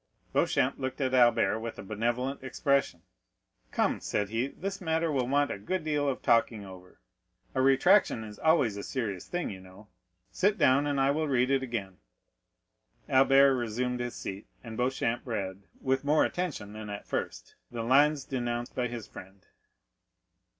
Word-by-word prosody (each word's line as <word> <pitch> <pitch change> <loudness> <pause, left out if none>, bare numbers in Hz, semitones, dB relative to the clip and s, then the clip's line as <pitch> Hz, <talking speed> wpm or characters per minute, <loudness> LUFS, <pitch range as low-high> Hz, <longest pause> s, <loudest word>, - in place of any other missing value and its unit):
Beauchamp 130 - +1
looked 130 +1 -4
at 130 -2 0
Albert 120 -4 +4
with 115 0 -6
a - - -7
benevolent 120 +6 -2
expression. 140 +1 0 0.7
"Come," - - +1
said 105 -1 -2
he, 115 +4 -1
"this 195 +7 -6
matter 160 -1 0
will 130 -4 0
want 145 +2 +2
a - - -5
good 185 - -3
deal 150 -2 0
of 130 - -4
talking 115 -3 +2
over; 90 -1 -13 0.5
a 130 - +1
retractation 135 - +4
is 105 -1 -10
always 140 -10 +3
a - - -4
serious 105 -8 -4
thing, 175 0 -3
you 95 - -8
know. 95 +3 -15 0.4
Sit 200 - +1
down, 140 -1 +4
and 145 -1 0
I 135 +1 +3
will 155 +2 -1
read 130 -1 +2
it 135 -1 +2
again." 110 -7 -4 1.1
Albert 135 +1 +5
resumed 125 +1 -2
his 120 0 -4
seat, 100 +2 -7 0.2
and 115 -2 -8
Beauchamp 125 -1 0
read, 100 -5 -4 0.2
with 135 +1 0
more 150 +2 +3
attention 145 - -4
than 110 -1 -7
at 100 0 -6
first, - - -4 0.2
the 115 -1 -4
lines 140 +3 +3
denounced 120 -2 -3
by 125 -1 -1
his 115 -3 -6
friend. 95 0 -13
125 Hz, 165 wpm, -29 LUFS, 110-140 Hz, 1.1 s, Albert